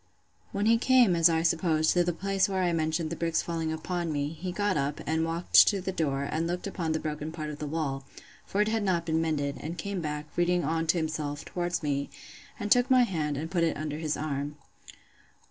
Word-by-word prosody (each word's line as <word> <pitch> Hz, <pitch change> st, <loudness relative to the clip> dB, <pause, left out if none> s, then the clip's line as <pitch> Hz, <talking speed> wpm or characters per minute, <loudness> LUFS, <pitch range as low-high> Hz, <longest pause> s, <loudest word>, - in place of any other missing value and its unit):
When 205 Hz, -1 st, -1 dB
he 230 Hz, +1 st, +4 dB
came, 250 Hz, -7 st, +5 dB
as 165 Hz, 0 st, +6 dB
I 165 Hz, 0 st, +1 dB
suppose, 160 Hz, -2 st, +2 dB
to 175 Hz, -, +3 dB
the 175 Hz, -, 0 dB
place 195 Hz, +3 st, 0 dB
where 190 Hz, -1 st, 0 dB
I 175 Hz, -1 st, +1 dB
mentioned 160 Hz, 0 st, -1 dB
the -, -, -2 dB
bricks 165 Hz, -1 st, 0 dB
falling 165 Hz, -2 st, -2 dB
upon 170 Hz, +1 st, -3 dB
me, 145 Hz, -1 st, -1 dB
he 175 Hz, +3 st, -5 dB
got 205 Hz, +1 st, 0 dB
up, 140 Hz, +1 st, -1 dB
and 160 Hz, +1 st, 0 dB
walked 165 Hz, +2 st, +5 dB
to 200 Hz, -, +2 dB
the 190 Hz, +1 st, -3 dB
door, 140 Hz, -6 st, -1 dB
and 160 Hz, +3 st, -1 dB
looked 175 Hz, +1 st, -3 dB
upon 175 Hz, -5 st, -2 dB
the 160 Hz, -, 0 dB
broken 150 Hz, 0 st, -4 dB
part 155 Hz, -2 st, -5 dB
of 150 Hz, -, -9 dB
the 150 Hz, -, -4 dB
wall; 140 Hz, -3 st, -2 dB, 0.4 s
for 200 Hz, -, -1 dB
it 210 Hz, -, +2 dB
had 220 Hz, 0 st, 0 dB
not 180 Hz, -4 st, 0 dB
been 160 Hz, 0 st, +1 dB
mended; 145 Hz, -3 st, -1 dB
and 165 Hz, +3 st, -6 dB
came 200 Hz, -3 st, -3 dB
back, 150 Hz, -1 st, -4 dB
reading 175 Hz, 0 st, +2 dB
on 160 Hz, +2 st, -1 dB
to 165 Hz, -, +3 dB
himself, 155 Hz, -2 st, -3 dB
towards 175 Hz, -1 st, -2 dB
me; 140 Hz, -1 st, -1 dB, 0.5 s
and 205 Hz, 0 st, -4 dB
took 245 Hz, 0 st, +5 dB
my 255 Hz, -1 st, +6 dB
hand, 155 Hz, -, -1 dB
and 160 Hz, +3 st, -5 dB
put 170 Hz, -3 st, +1 dB
it 165 Hz, -, +1 dB
under 150 Hz, 0 st, -4 dB
his 155 Hz, -2 st, -1 dB
arm. 145 Hz, -1 st, -3 dB
165 Hz, 230 wpm, -28 LUFS, 155-180 Hz, 0.5 s, as